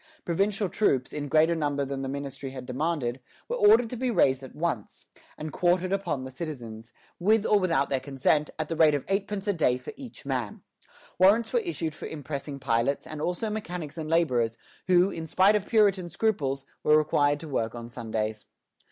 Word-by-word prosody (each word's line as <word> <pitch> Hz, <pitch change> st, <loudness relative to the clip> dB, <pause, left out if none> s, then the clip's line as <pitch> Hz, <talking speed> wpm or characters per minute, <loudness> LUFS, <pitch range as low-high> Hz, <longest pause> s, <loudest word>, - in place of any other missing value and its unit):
Provincial 195 Hz, +4 st, 0 dB
troops, 135 Hz, -, +1 dB
in 145 Hz, -1 st, -3 dB
greater 160 Hz, +4 st, +4 dB
number 145 Hz, -3 st, -1 dB
than 135 Hz, 0 st, -4 dB
the 135 Hz, -, -3 dB
ministry 140 Hz, 0 st, -5 dB
had 130 Hz, -1 st, -8 dB
demanded, 135 Hz, -1 st, -2 dB, 0.3 s
were 485 Hz, -, -2 dB
ordered 420 Hz, -, +6 dB
to -, -, -3 dB
be 255 Hz, +1 st, -1 dB
raised 135 Hz, -, +3 dB
at 130 Hz, -, -11 dB
once, 150 Hz, -10 st, -3 dB, 0.3 s
and 155 Hz, -1 st, -6 dB
quartered 180 Hz, +1 st, +2 dB
upon 170 Hz, -9 st, -1 dB
the 130 Hz, -, -7 dB
citizens, 120 Hz, -7 st, -7 dB, 0.3 s
with 215 Hz, +4 st, +3 dB
or 210 Hz, -, +4 dB
without 170 Hz, -7 st, +1 dB
their 135 Hz, -, +1 dB
consent, 140 Hz, +3 st, +1 dB
at 155 Hz, -1 st, -2 dB
the 165 Hz, -, -3 dB
rate 155 Hz, -2 st, +5 dB
of 145 Hz, -, -3 dB
eightpence 195 Hz, +1 st, -2 dB
a 205 Hz, -, +3 dB
day 135 Hz, -8 st, +2 dB
for 130 Hz, -, -9 dB
each 255 Hz, -, -11 dB
man. 125 Hz, -6 st, -3 dB, 0.6 s
Warrants 205 Hz, +5 st, +4 dB
were 485 Hz, -, +4 dB
issued 335 Hz, -, -3 dB
for -, -, -7 dB
impressing 145 Hz, -1 st, -5 dB
pilots, 125 Hz, +1 st, 0 dB
and 155 Hz, -1 st, -7 dB
also 180 Hz, +7 st, -1 dB
mechanics 180 Hz, -8 st, -5 dB
and 155 Hz, -2 st, -5 dB
laborers, 125 Hz, -9 st, +2 dB, 0.3 s
who, 180 Hz, +1 st, +4 dB
in 165 Hz, -2 st, -6 dB
spite 190 Hz, +6 st, +4 dB
of 205 Hz, -1 st, -1 dB
Puritan 200 Hz, -5 st, +3 dB
scruples, 155 Hz, -9 st, -1 dB, 0.2 s
were 150 Hz, -, +5 dB
required 145 Hz, -1 st, +2 dB
to 160 Hz, -, -7 dB
work 115 Hz, -5 st, -2 dB
on 115 Hz, -1 st, -7 dB
Sundays. 110 Hz, -3 st, -4 dB
155 Hz, 190 wpm, -27 LUFS, 135-190 Hz, 0.6 s, ordered